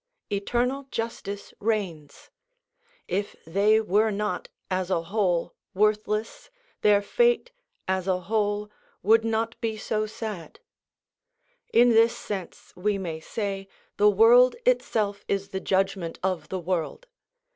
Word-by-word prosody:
Eternal 245 +7 -1
justice 225 -4 -5
reigns; 195 -9 -3 0.8
if 200 +2 -2
they 200 +6 +3
were 215 +1 +2
not, 210 -3 -2 0.2
as 185 0 -1
a 170 -3 +1
whole, 175 -2 0 0.2
worthless, 215 - 0 0.3
their 205 -1 +4
fate, 485 - +2 0.4
as 190 0 -1
a 185 -1 +1
whole, 210 +1 -1 0.3
would 220 +3 +5
not 225 0 -1
be 220 -1 -2
so 215 0 -1
sad. 210 -6 -7 1.1
In 240 +1 +6
this 230 0 +4
sense 195 -4 -7
we 200 +3 0
may 170 -4 -4
say, 195 +2 -4 0.3
the 210 +1 +6
world 235 +5 +6
itself 215 - +1
is 195 0 -1
the 190 - -3
judgment 190 -3 0
of 180 -5 -1
the 190 - -3
world. 180 - -3
205 Hz, 125 wpm, -26 LUFS, 190-225 Hz, 1.1 s, In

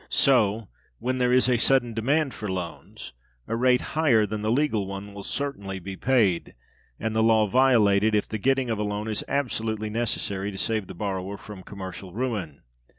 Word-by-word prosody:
So, 115 -6 +3 0.3
when 130 - -2
there 125 -1 +2
is 130 0 +4
a 125 -1 +3
sudden 120 -1 +3
demand 135 +6 +1
for 105 -3 -5
loans, 90 -7 -6 0.3
a 115 - -1
rate 125 +1 +3
higher 135 -9 +4
than 105 +1 -4
the 105 - -1
legal 115 -6 +1
one 100 +1 -7
will 100 - -7
certainly 100 -6 -4
be 95 +1 -7
paid, 110 -8 +1 0.4
and 110 0 -2
the 110 - +3
law 110 -1 +4
violated, 110 -3 +4
if 105 - +1
the 110 - -4
getting 135 +1 +1
of 110 - -1
a - - 0
loan 105 +1 -3
is 110 -1 -1
absolutely 110 -6 -2
necessary 100 -3 -1
to 95 - -7
save 110 -2 -1
the - - -9
borrower 95 0 -3
from 105 -2 -10
commercial 95 -1 -8
ruin. 105 - -3
110 Hz, 185 wpm, -25 LUFS, 100-125 Hz, 0.4 s, is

